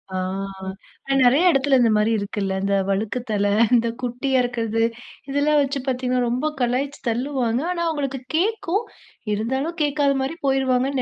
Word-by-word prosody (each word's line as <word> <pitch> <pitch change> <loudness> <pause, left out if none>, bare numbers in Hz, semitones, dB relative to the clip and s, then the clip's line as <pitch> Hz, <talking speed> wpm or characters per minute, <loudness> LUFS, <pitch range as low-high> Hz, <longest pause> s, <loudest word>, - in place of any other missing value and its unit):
ஆ, - - 0 0.9
ஆனா, 275 - +1
நிறைய 280 +9 +5
இடத்துல 275 -1 +3
இந்த 230 - +4
மாரி 210 +2 +2
இருக்குல்ல, 200 -1 -2
இந்த 200 0 +1
வழுக்கு 210 +5 -1
தலை 205 -1 +1 0.2
இந்த 235 0 +2
குட்டியா 250 +2 0
இருக்கறது, 225 -2 -1 0.5
இதெல்லாம் 290 +2 +2
வச்சு 275 0 -1
பார்த்தீங்கன்னா, 250 -1 0
ரொம்ப 260 +6 -1
கலாய்ச்சு 260 +4 -1
தள்ளுவாங்க. 250 0 -1
ஆனா 340 -1 -2
அவங்களுக்கு 275 -4 -2
கேட்கும், 410 +2 0 0.5
இருந்தாலும் 265 - -2
கேட்காத 285 -1 +2
மாரி 325 +5 -4
போயிருவாங்கன்னு 265 0 +1
260 Hz, 140 wpm, -22 LUFS, 235-285 Hz, 0.9 s, நிறைய